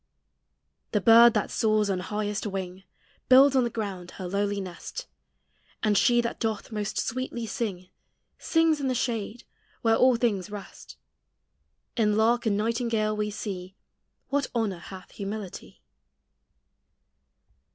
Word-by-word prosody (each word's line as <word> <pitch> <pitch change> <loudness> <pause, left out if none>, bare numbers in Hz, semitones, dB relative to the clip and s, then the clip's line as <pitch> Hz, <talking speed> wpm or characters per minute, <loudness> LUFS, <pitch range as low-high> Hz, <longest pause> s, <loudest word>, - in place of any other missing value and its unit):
The 210 - +3
bird 230 +3 +7
that 210 - 0
soars 215 -1 +2
on 190 -2 -1
highest 210 +2 -3
wing 190 -1 -5 0.4
Builds 270 +2 +7
on 260 - +4
the 240 - 0
ground 195 -6 -5
her 185 - -6
lowly 200 +2 -1
nest; 190 - -7 0.8
And 210 -1 +3
she 240 +4 +4
that 235 - -4
doth 220 -1 -3
most 210 -1 -3
sweetly 250 -1 -3
sing 195 -5 -4 0.5
Sings 325 -2 +2
in 270 - -1
the 255 - 0
shade, 230 -1 -2 0.4
where 225 -1 +4
all 255 +1 +5
things 210 -5 0
rest; 205 -1 -10 1.0
In 210 -2 +2
lark 230 +2 +2
and 200 -2 +2
nightingale 225 -1 0
we 210 0 -1
see 195 -3 -6 0.5
What 280 -1 0
honor 210 -6 -1
hath 185 +2 -11
humility. 200 -1 -7
215 Hz, 130 wpm, -27 LUFS, 200-235 Hz, 1.0 s, bird